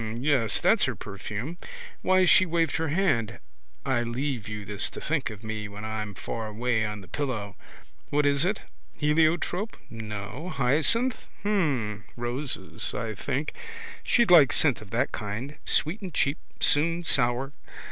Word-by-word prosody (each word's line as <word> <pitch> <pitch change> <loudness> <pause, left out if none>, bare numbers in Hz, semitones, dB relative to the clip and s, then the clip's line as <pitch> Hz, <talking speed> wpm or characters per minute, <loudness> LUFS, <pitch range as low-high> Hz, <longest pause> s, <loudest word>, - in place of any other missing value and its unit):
Yes. 130 -4 +2
That's - - +4
her - - -2
perfume. 105 - -6 0.4
Why 185 0 +4
she 185 - +7
waved 165 -3 +1
her 160 0 -1
hand. 145 - +1 0.5
I 125 -3 +1
leave 120 -1 -2
you 105 -1 -5
this 105 +1 0
to - - -8
think 150 -6 -1
of 110 0 -10
me 110 -1 -4
when 105 +1 -8
I'm 105 -2 -4
far 115 +2 -4
away 110 +1 0
on 105 -1 -3
the 95 - -13
pillow. 110 -5 -3 0.5
What 150 0 +2
is 140 +1 +3
it? 195 +3 0 0.3
Heliotrope? 165 +7 +1
No. 110 - -6
Hyacinth? 155 - +3 0.2
Hm. 135 - 0
Roses, 120 +4 -1
I 110 -1 -3
think. 140 +8 -3 0.5
She'd 235 -6 +3
like 155 -7 +8
scent 140 -8 +3
of 105 - -12
that 120 +5 0
kind. 115 +7 -5
Sweet 175 +8 +1
and 190 -2 -6
cheap: 140 -1 +1 0.2
soon 165 +4 +2
sour. 130 -1 +1
130 Hz, 150 wpm, -27 LUFS, 110-160 Hz, 0.5 s, like